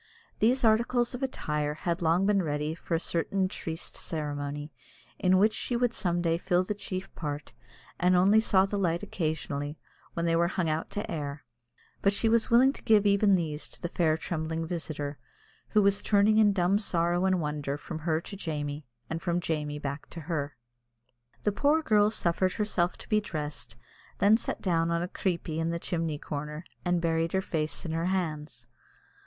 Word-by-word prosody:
These 250 +4 +3
articles 235 +2 +3
of 250 - -5
attire 150 - -2
had 170 +2 -2
long 170 +3 +3
been 200 -1 +3
ready 150 -1 -1
for 165 +1 -3
a - - +1
certain 185 +3 0
triste 165 -3 -5
ceremony, 145 -1 -4 0.5
in 185 0 +4
which 215 +3 +4
she 245 - -2
would 245 -1 +1
some 175 -2 0
day 165 0 +1
fill 180 0 +2
the 195 - -2
chief 195 -2 -6
part, 145 -2 -5 0.5
and 180 +1 +4
only 195 +4 +5
saw 195 -3 +4
the 200 +1 -2
light 175 -1 0
occasionally, 155 -5 -3 0.4
when 170 - -1
they 165 0 +2
were 170 +1 +3
hung 180 -1 -1
out 155 +1 -1
to 205 +1 -4
air; 145 -2 -4 0.6
but 200 - +3
she 225 - +1
was 230 0 +3
willing 255 +4 +6
to - - -11
give 215 -3 +4
even 200 0 +5
these 155 -4 -2
to - - -13
the 175 - -4
fair 160 -3 +2
trembling 160 0 -3
visitor, 155 -4 -4 0.5
who 210 -1 +4
was 200 0 +3
turning 210 +1 +4
in 210 -2 +6
dumb 195 +1 +2
sorrow 175 -2 +1
and 190 -1 +2
wonder 150 -2 -2
from 155 - -6
her 160 0 0
to 200 - -9
Jamie, 150 -6 -4 0.2
and 160 +1 -4
from 175 -1 0
Jamie 150 -3 -2
back 140 0 -5
to 165 - -8
her. 145 -4 -3 0.9
The 210 - +2
poor 295 +9 +2
girl 210 -5 +4
suffered 185 -2 +1
herself 185 -5 0
to - - -12
be 215 -1 +2
dressed, 150 - -5
and 120 - -27 0.5
then 220 - +7
sat - - -4
down 165 -4 +2
on 170 0 0
a - - -2
"creepie" 170 -4 -2
in 165 0 0
the 170 - -1
chimney 165 -3 -2
corner, 150 +2 -5 0.2
and 175 -1 +1
buried 165 0 0
her 190 - +2
face 155 -3 -2
in 165 - -3
her 165 +1 -1
hands. 160 -5 -3
170 Hz, 190 wpm, -29 LUFS, 155-200 Hz, 0.9 s, then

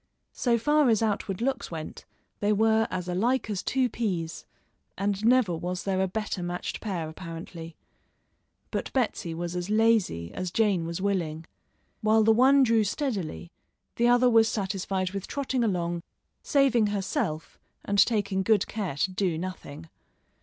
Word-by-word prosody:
So 240 -2 +1
far 295 +3 +3
as 225 -1 +3
outward 205 -1 -1
looks 265 -1 -1
went, 160 -2 -7 0.3
they 205 +1 +1
were 220 +1 +3
as 180 -1 -4
alike 220 +6 0
as 195 -2 -2
two 260 -1 +1
peas, 185 -9 -3 0.5
and 200 +1 -1
never 235 -6 +4
was 180 +2 -4
there 190 -1 0
a 190 - +2
better 210 -1 -3
matched 175 0 -4
pair 180 -7 -3
apparently. 165 0 -8 1.0
But - - -3
Betsy 210 -9 -1
was 175 +1 -4
as 180 +2 -3
lazy 215 - +2
as 185 -1 -3
Jane 195 -4 +1
was 170 +2 -4
willing. 170 -5 -1 0.6
While 220 +1 +4
the 225 +1 +5
one 265 +4 +5
drew 230 -3 +3
steadily, 195 - -3 0.5
the 235 - +3
other 245 +1 +5
was 225 -2 +5
satisfied 190 -2 -2
with 195 -1 -5
trotting 270 -3 -1
along, 175 -5 -1 0.4
saving 265 -7 +3
herself 190 -6 -3 0.3
and 200 0 +1
taking 205 -4 0
good 205 0 +3
care 200 -10 -4
to 185 +7 0
do 185 -3 -1
nothing. 165 - -7
200 Hz, 155 wpm, -27 LUFS, 175-225 Hz, 1.0 s, the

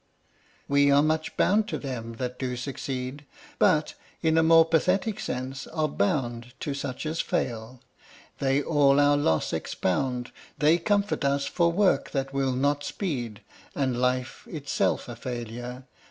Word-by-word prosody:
We 140 0 +4
are 140 +1 +5
much 155 0 -1
bound 210 +2 +3
to - - -3
them 115 -4 -5
that 125 +1 -5
do 125 -2 -2
succeed; 130 +1 -5 0.4
But, 160 -6 +3 0.3
in 160 -1 +3
a 160 - +5
more 165 0 +6
pathetic 185 +6 +1
sense, 130 +2 -4
are 155 -1 -1
bound 125 - -1
To 145 - -2
such 140 0 -5
as 155 +2 -1
fail. 120 +1 -3 0.6
They 135 +1 +2
all 145 -3 +4
our 145 0 +5
loss 80 - +1
expound; 125 +6 -1 0.3
They 155 +3 +4
comfort 205 0 0
us 140 0 +1
for 170 +2 +2
work 180 -6 +2
that 135 -1 -2
will 135 -1 +1
not 145 +3 +1
speed, 125 - -4 0.3
And 130 -3 0
life 125 +1 -1
itself 145 -4 -1
a 120 - -6
failure. 120 +1 -6
140 Hz, 150 wpm, -27 LUFS, 125-155 Hz, 0.6 s, more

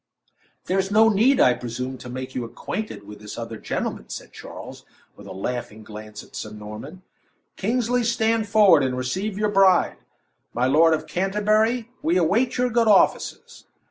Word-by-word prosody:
"There's 190 +1 0
no 220 +2 +5
need, 230 +6 +3
I 125 - +6
presume, 125 +2 -5
to 125 - -9
make 130 +1 -6
you 125 - -3
acquainted 165 - -6
with 105 +1 -11
this 105 0 -9
other 115 -1 -6
gentleman," - - -4
said - - -8
Charles, - - -10 0.3
with - - -13
a - - -8
laughing 110 +2 -5
glance 105 0 -10
at - - -16
Sir 110 - -5
Norman. 105 - -9 0.5
"Kingsley, 240 +3 0
stand 225 -2 +1
forward 200 -7 +6
and 130 -1 -1
receive 190 +11 -3
your 210 0 +1
bride. 195 -3 +4 0.6
My 120 +2 +1
Lord 160 +5 +5
of - - -6
Canterbury, 215 +5 0
we 170 +3 +1
await 205 +9 +1
your 250 0 +1
good 230 0 +2
offices." 205 -2 +1
185 Hz, 165 wpm, -23 LUFS, -, 0.6 s, I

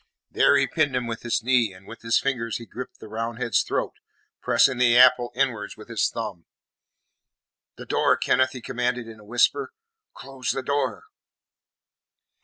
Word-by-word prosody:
There - - +4
he - - +3
pinned 145 -5 0
him 125 -1 -1
with 115 -1 -5
his 120 -1 -1
knee, 120 -4 +2
and 95 +1 -16
with 115 - -11
his 115 0 +2
fingers 120 -5 -1
he 115 - -10
gripped 125 +2 -9
the - - -11
Roundhead's 115 0 -1
throat, - - -2 0.5
pressing 130 -2 +3
the 120 -1 +4
apple 125 -1 +6
inwards 120 -6 -1
with 110 +2 -13
his 115 -2 +1
thumb. 100 -8 -6 1.3
"The - - -10
door, - - +2
Kenneth!" 130 0 +2
he 125 - -8
commanded, 125 0 -2
in 110 -1 -11
a - - -15
whisper. 120 - +1 0.4
"Close 135 -2 -7
the 135 - -4
door!" 145 - -1
120 Hz, 165 wpm, -24 LUFS, 115-130 Hz, 1.3 s, apple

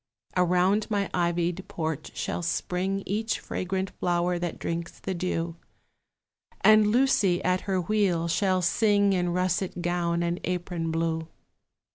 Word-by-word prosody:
Around 180 +4 +2
my 205 -2 -1
ivied 175 +1 0
porch 160 -6 -4
shall - - -2
spring 185 +3 -1
Each 220 +3 -1
fragrant 190 +1 -3
flower 175 0 +1
that 175 -1 -3
drinks 170 +1 -4
the 190 - -3
dew; 170 -2 -2 1.0
And 215 -1 +6
Lucy 235 -6 +3
at 185 0 +1
her 190 -1 +2
wheel 180 -3 +1
shall 185 +2 +1
sing 205 +2 +3
In 180 -1 +1
russet 180 0 -1
gown 170 0 0
and 170 +1 -1
apron 175 -2 -2
blue. 160 0 -1
180 Hz, 130 wpm, -27 LUFS, 170-195 Hz, 1.0 s, And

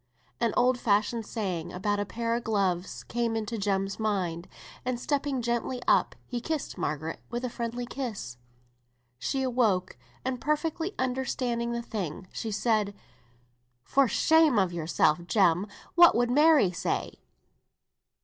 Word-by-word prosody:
An 235 -2 +2
old 250 0 +3
fashioned 215 +1 +1
saying 185 -7 -3
about 205 +3 -1
a 205 - -2
pair 230 +1 -2
of 235 0 -1
gloves 195 -5 -1
came 235 -1 -1
into 225 0 -3
Jem's 195 0 -1
mind, 185 -6 -1 0.4
and 250 -1 -2
stepping 280 -1 -1
gently 240 +2 -1
up - - +3
he 245 -1 -4
kissed 315 +1 -3
Margaret 155 +2 -3
with 240 +2 -3
a 245 - -3
friendly 240 +1 -3
kiss. 230 - -5 0.8
She 265 - -1
awoke, 215 - +1 0.3
and 255 -1 -2
perfectly 320 +5 -1
understanding 250 -2 -1
the 235 0 -3
thing, 185 -5 -5
she 225 - -4
said, 210 -1 +1 0.9
"For 275 - +3
shame 315 +1 +4
of 190 -3 +2
yourself, 165 0 +2
Jem! 185 -1 +3 0.3
What 345 0 +7
would 240 +1 +2
Mary 295 - +5
say?" 170 - -3
230 Hz, 140 wpm, -28 LUFS, 195-250 Hz, 0.9 s, What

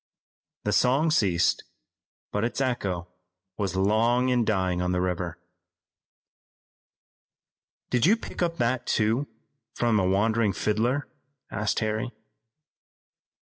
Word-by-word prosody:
The - - 0
song 140 +6 +3
ceased, 95 - +2 0.7
but 105 - -1
its 120 - -2
echo 100 -10 -1 0.5
was 95 -3 -1
long 115 +6 +2
in 125 -2 +3
dying 95 -4 0
on 90 0 0
the 90 - +1
river. 90 -2 -2 2.5
"Did 125 +5 +3
you 220 +4 +5
pick - - -8
up 170 -1 0
that, 120 +1 0
too, 115 +6 +1 0.5
from 115 -3 +2
a 95 - +2
wandering 105 +2 +2
fiddler?" 115 +8 0 0.4
asked 105 +2 -1
Harry. 110 +3 -1
110 Hz, 110 wpm, -26 LUFS, 95-125 Hz, 2.5 s, you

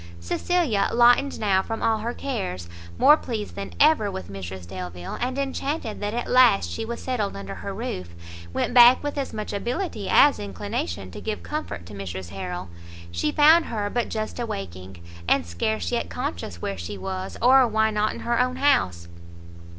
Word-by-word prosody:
Cecilia, 230 - 0
lightened 245 +4 +4
now 195 -3 +3
from 225 +3 -5
all 220 -1 +2
her 235 +3 -3
cares, 90 - -4 0.3
more 300 - +7
pleased 225 -8 -5
than 200 0 -6
ever 295 -9 +5
with 95 - -7
Mrs 95 -2 -7
Delvile, 90 -1 -6
and 255 +2 -1
enchanted 275 -3 -3
that 205 +2 -3
at 240 - -2
last 100 - +5
she - - -3
was 235 +1 -5
settled 220 - -2
under 100 0 -6
her 90 - -6
roof, 85 -2 -5 0.4
went 165 - -1
back 245 +2 +8
with 290 0 -3
as 280 -2 -3
much 215 -1 -5
ability 235 - -3
as 290 0 +6
inclination 95 -1 -4
to - - -9
give 215 -1 -4
comfort 300 - -5
to 95 - -11
Mrs 95 -2 -6
Harrel. 90 -1 -5 0.4
She 85 - -1
found 315 +3 +6
her 205 -2 -3
but 240 -1 -1
just 215 +2 -4
awaking, 95 - -6 0.2
and - - +3
scarce 85 +2 -2
yet - - -1
conscious 85 +1 -4
where 100 -2 -3
she 100 +4 -6
was, 190 - -5
or 255 +1 +6
why 220 0 +2
not 210 0 +1
in - - -8
her 235 0 0
own 255 0 +1
house. 95 - +2
205 Hz, 180 wpm, -24 LUFS, -, 0.4 s, back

